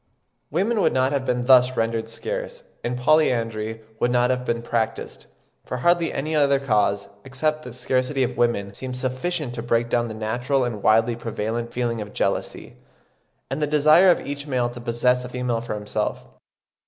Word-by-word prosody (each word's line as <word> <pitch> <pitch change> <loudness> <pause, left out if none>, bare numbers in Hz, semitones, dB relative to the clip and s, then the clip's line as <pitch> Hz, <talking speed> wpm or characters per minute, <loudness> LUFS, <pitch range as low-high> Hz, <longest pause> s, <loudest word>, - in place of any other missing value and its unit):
Women 200 - +1
would - - +3
not 130 +1 +2
have 140 -2 -1
been 125 -1 0
thus 130 0 +5
rendered 115 0 -1
scarce, - - -5 0.2
and 120 +1 -2
polyandry 115 -6 +1 0.2
would 120 - +2
not 125 0 +3
have 125 0 -2
been 115 -1 -1
practised; 115 -1 -3 0.4
for 125 - -5
hardly 175 +5 +2
any 155 +3 -2
other 140 -2 +3
cause, 105 -6 +1 0.2
except 155 +3 -1
the 125 - -9
scarcity 130 +2 0
of 125 0 -2
women 120 -5 0
seems 125 +4 -5
sufficient 130 +2 -2
to 120 - -4
break 120 0 0
down 120 0 +1
the 110 - -6
natural 125 +5 0
and 115 -4 -3
widely 115 +3 +3
prevalent 115 +1 -3
feeling 120 -2 -2
of 105 0 -8
jealousy, - - -2 0.7
and 135 +3 -2
the 150 - +2
desire 155 +5 +5
of 175 - +2
each 145 +1 -5
male 125 -3 0
to 120 0 -9
possess 125 +1 +1
a 125 - -7
female 125 -2 -2
for 115 - -4
himself. 105 0 -3
125 Hz, 180 wpm, -23 LUFS, 115-140 Hz, 0.7 s, thus